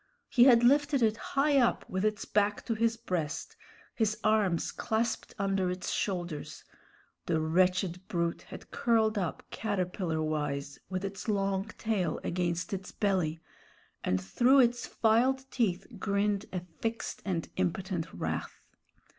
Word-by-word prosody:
He 245 -1 +6
had 240 -3 +7
lifted 285 +1 +4
it 220 -1 +3 0.2
high 280 0 +5
up 240 -2 +2
with 185 +1 -2
its 215 0 0
back 205 0 +1
to 230 - 0
his 225 +1 +1
breast, 175 -9 -3 0.4
his 215 -2 0
arms 210 -6 +2
clasped 225 0 -2
under 195 -2 +1
its 180 0 -3
shoulders; 175 -6 -3 0.6
the 165 -2 +2
wretched 180 +3 +1
brute 170 -1 -1
had - - -11
curled 225 -2 +2
up 180 -4 -3
caterpillar 180 -6 -1
wise, 145 -2 -2
with 185 0 -2
its 195 +2 -6
long 195 -2 0
tail 195 -8 -1
against 175 +1 -1
its 190 -1 -5
belly, 180 -6 0 0.6
and 95 - +1
through 245 - +4
its 240 0 +1
filed 250 +4 +2
teeth 195 -6 0
grinned 200 0 0
a 180 - -3 0.2
fixed 230 0 -3
and 175 -5 -2
impotent 185 -1 -1
wrath. - - -4
195 Hz, 140 wpm, -30 LUFS, 175-225 Hz, 0.6 s, had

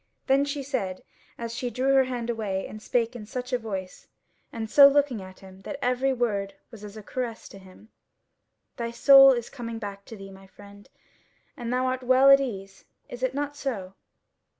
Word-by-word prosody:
Then 275 +1 +3
she 285 0 -4
said, 195 -9 -4 0.3
as 230 -1 -6
she 245 +1 -3
drew 255 +4 0
her 265 -1 +5
hand 240 -2 -3
away 200 -4 -3
and 215 - -10
spake 235 +1 -1
in 215 -3 -9
such 250 +1 -6
a 250 - +1
voice, 195 -5 -7 0.4
and 225 -1 -5
so 280 +5 +8
looking 280 -6 +1
at 185 0 -13
him, 190 0 -14
that 285 - -7
every 255 +1 0
word 210 -6 -2 0.2
was 220 -3 -12
as 210 +1 -10
a 215 - -10
caress 240 0 -5
to 195 - -12
him: 190 +3 -17 0.9
"Thy 235 -2 -3
soul 270 +3 +7
is 240 -2 -2
coming 230 -4 -7
back 200 -2 -8
to 225 - -10
thee, 195 0 -11
my 195 0 -15
friend, 200 +1 -16 0.7
and 235 -1 -5
thou 255 +1 0
art 255 0 -1
well 260 +2 +5
at 275 - +8
ease: 195 -7 -6 0.2
is 245 - -9
it 260 0 -1
not 290 0 -3
so?" 210 -10 -5
235 Hz, 195 wpm, -26 LUFS, 200-260 Hz, 0.9 s, so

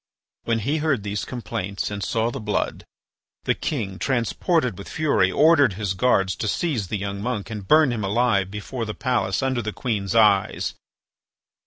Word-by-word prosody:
When 115 -1 +1
he 140 +8 0
heard 150 -8 0
these 100 0 -3
complaints 100 -5 -4
and 100 -1 -4
saw 115 +3 0
the - - -5
blood, 105 -1 -2 0.6
the - - +2
king, 100 -10 -3
transported 130 - 0
with 100 - -9
fury, 140 -12 +2
ordered 145 - +5
his 100 -1 -2
guards 95 -3 +2
to - - -2
seize 120 - -1
the 105 - -2
young 100 0 -4
monk 115 -2 -3
and 105 -3 -6
burn 155 -3 +5
him 110 -3 -2
alive 100 -2 +1
before 110 +4 -5
the 105 - -5
palace 120 -5 0
under 130 -2 0
the 110 -1 -3
queen's 105 -4 -2
eyes. 105 -4 +3
110 Hz, 170 wpm, -23 LUFS, 100-130 Hz, 0.6 s, ordered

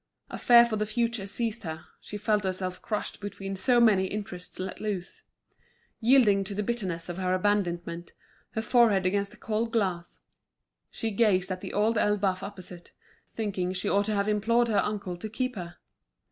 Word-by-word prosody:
A - - -4
fear 235 -1 +7
for 225 -2 -2
the 215 0 -1
future 230 -2 -1
seized 225 +2 -2
her, 160 -3 -6
she 210 - -7
felt 210 0 +1
herself 185 -1 -3
crushed 210 -2 -3
between 195 -1 -5
so 240 +6 +3
many 210 -5 +5
interests 185 -3 -6
let 185 0 -5
loose. 200 -5 -4 0.8
Yielding 225 -5 +5
to 200 +1 -6
the 210 - -1
bitterness 195 -7 -3
of 175 0 -5
her 185 0 +1
abandonment, 175 -4 -1 0.4
her 220 - -2
forehead 220 -5 +4
against 200 +2 +1
the - - -16
cold 225 +1 -2
glass, 185 -6 -2 0.7
she 225 - -3
gazed 195 -3 +2
at 185 0 -4
The - - -6
Old 215 +2 +2
Elbeuf 200 -3 +1
opposite, 185 -3 -9 0.4
thinking 195 -5 -2
she 180 - -2
ought 200 +1 +2
to 215 0 0
have 200 0 0
implored 230 +3 +2
her 210 -2 +3
uncle 200 -4 -3
to 215 +5 -6
keep 255 +3 -2
her. 175 -3 -7
205 Hz, 175 wpm, -28 LUFS, 185-220 Hz, 0.8 s, fear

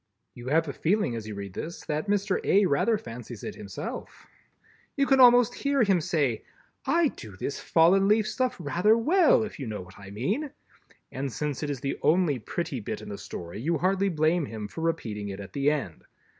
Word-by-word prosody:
You 120 +1 -10
have 160 +4 +2
a 140 - -4
feeling 175 - 0
as 110 -2 -6
you 105 - -6
read 100 -2 -7
this, 170 - -6
that 150 +5 -2
Mr. 200 -1 +1
A. 200 +1 +4
rather 185 +8 +2
fancies 120 - -9
it - - -5
himself. 100 -2 -7 0.7
You 280 - +3
can 270 -1 +3
almost 245 -2 +7
hear 280 -3 +1
him 195 -5 +3
say: 150 -9 0 0.4
"I 335 -2 +3
do 105 - -11
this 140 - -4
fallen 180 +4 +4
leaf 215 +1 +3
stuff 255 +1 -1
rather 175 +8 +3
well, 315 +2 +4
if 215 - -7
you 135 - -4
know 105 -3 -4
what 95 +2 -15
I 100 -1 -10
mean!" 195 - -2 0.6
and 135 0 -3
since 150 +1 -3
it 150 - -2
is 140 -3 -4
the 135 - -3
only 160 -5 +3
pretty 140 +2 -4
bit 105 - -5
in - - -9
the 100 - -5
Story, 85 +5 -7
you 165 +5 0
hardly 195 +5 +1
blame 160 -1 +1
him 110 -2 -6
for 160 - -8
repeating 110 -11 -2
it 100 0 -6
at 95 -1 -9
the 140 +1 +2
end. 140 - -3
155 Hz, 205 wpm, -27 LUFS, -, 0.7 s, almost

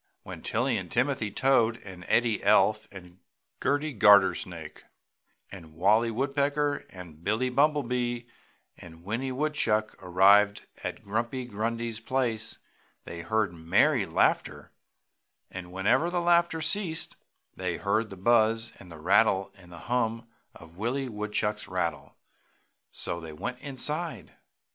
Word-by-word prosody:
When - - -9
Tilly 120 +1 0
and 90 -3 -6
Timothy 125 -3 0
Toad 120 -1 +2
and 95 -2 -10
Eddie 115 -2 +2
Elf 105 +1 +3
and 90 -2 -13 0.4
Gerty 145 +2 0
Gartersnake 95 -6 +3 0.7
and 80 -5 -12
Wallie 105 +7 +3
Woodpecker 140 +4 -1
and 85 -4 -12
Billie 110 +6 0
Bumblebee 125 -4 +1 0.6
and 85 -1 -13
Winnie 115 +7 -3
Woodchuck 130 -6 0
arrived 100 +3 +4 0.2
at - - -5
Grumpy 115 +5 -2
Grundy's 115 0 -3
place 115 -3 -2 0.5
they 85 - -7
heard 110 0 0
merry 80 0 +2
laughter - - 0 0.8
and 90 -1 -8
whenever 95 - +2
the 175 0 -1
laughter 170 -1 +2
ceased, 165 -1 +1 0.4
they 90 -2 -3
heard 110 +2 0
the 95 - -10
buzz 115 +2 +2
and 85 -4 -12
rattle 100 0 +3
and 90 -2 -16
hum 115 +5 -2 0.3
of 85 0 -15
Willie 125 +5 -2
Woodchuck's 105 -1 -2
rattle. 85 -6 -3 0.7
So 85 - -4
they 80 -2 -9
went 125 +11 -5
inside. 150 +5 -3
110 Hz, 120 wpm, -28 LUFS, 95-130 Hz, 0.8 s, arrived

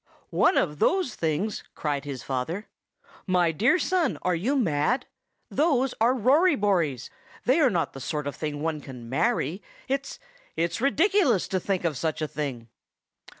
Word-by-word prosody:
"One - - +3
of 150 -3 0
those 365 - +2
things!" 165 +6 -2
cried 145 -2 -2
his 140 -3 -6
father. 140 - -3 0.6
"My 180 -3 +3
dear 230 - +3
son, 365 -2 +1
are 180 - +2
you 210 +12 0
mad? 190 - +1 0.5
Those 270 -4 +2
are 240 +3 +4
Rory 285 - +4
Bories; 175 - 0 0.3
they 260 +7 +4
are 290 -5 +5
not 175 -7 -1
the 135 - -8
sort 150 +2 -3
of 145 - -4
thing 150 -1 -4
one 160 -2 -1
can 125 -4 -10
marry. 185 - 0 0.3
It's—it's 280 - -4
ridiculous 285 - +3
to 190 - 0
think 190 0 -1
of 160 -5 -1
such 155 +4 -2
a 155 - -1
thing." 135 -6 -5
185 Hz, 155 wpm, -26 LUFS, -, 0.6 s, are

